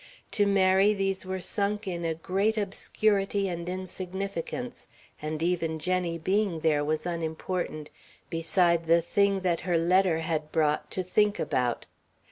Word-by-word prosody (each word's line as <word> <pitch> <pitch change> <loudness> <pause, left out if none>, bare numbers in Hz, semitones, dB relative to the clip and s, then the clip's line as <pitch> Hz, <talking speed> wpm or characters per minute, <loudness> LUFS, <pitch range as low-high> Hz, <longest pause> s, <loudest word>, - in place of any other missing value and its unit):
To 205 -1 +2
Mary 195 +1 +4
these 195 -1 -1
were 190 0 -2
sunk 205 +2 -1
in 170 -2 -3
a 165 -1 0
great 195 +7 0
obscurity 200 0 0
and 170 -1 -4
insignificance, 185 +5 -5 0.3
and 155 +1 -3
even 165 -2 0
Jenny 175 +1 -1
being 190 0 0
there 150 -2 +2
was 155 +2 -1
unimportant 165 -1 -3 0.4
beside 170 0 +1
the 170 0 +4
thing 200 +2 +2
that 175 -3 +1
her 175 -2 0
letter 180 0 +3
had 155 -2 -2
brought 150 -2 +1
to 185 - -2
think 210 +3 +2
about. 125 -2 -1
180 Hz, 140 wpm, -28 LUFS, 165-195 Hz, 0.4 s, Mary